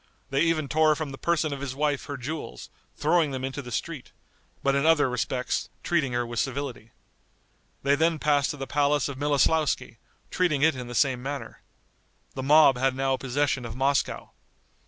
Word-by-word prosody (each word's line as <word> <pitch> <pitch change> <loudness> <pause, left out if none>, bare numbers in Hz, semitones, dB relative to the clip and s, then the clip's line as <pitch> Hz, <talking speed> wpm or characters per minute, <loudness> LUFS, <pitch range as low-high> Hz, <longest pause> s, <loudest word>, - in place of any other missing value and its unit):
They 135 - +1
even 165 -3 +1
tore 155 +1 +3
from 155 -2 -4
the 135 - -8
person 160 -3 0
of 140 - -6
his 135 -2 -4
wife 145 -1 -1
her 145 - -5
jewels, 145 +5 -6 0.3
throwing 160 0 +2
them 130 -1 -4
into 135 +2 -4
the 125 -2 -10
street, 145 +3 -5 0.5
but 140 - +2
in 140 0 +1
other 160 -3 +4
respects 125 +1 -2
treating 155 -7 0
her 120 0 0
with 120 -1 -4
civility. 135 -4 -3 0.9
They 140 +1 +3
then 160 +3 +2
passed 145 -2 +2
to 145 - -4
the 135 - -4
palace 145 -1 +1
of 140 -2 -7
Miloslauski, 145 -3 +1 0.3
treating 155 -6 +1
it 160 -2 +4
in 125 -1 -6
the 120 - -7
same 130 -1 +2
manner. 140 +2 -6 0.7
The 130 - -5
mob 140 -2 +5
had 135 0 +1
now 135 0 +1
possession 135 0 -1
of 115 -1 -6
Moscow. 135 +2 0
140 Hz, 180 wpm, -26 LUFS, 130-150 Hz, 0.9 s, mob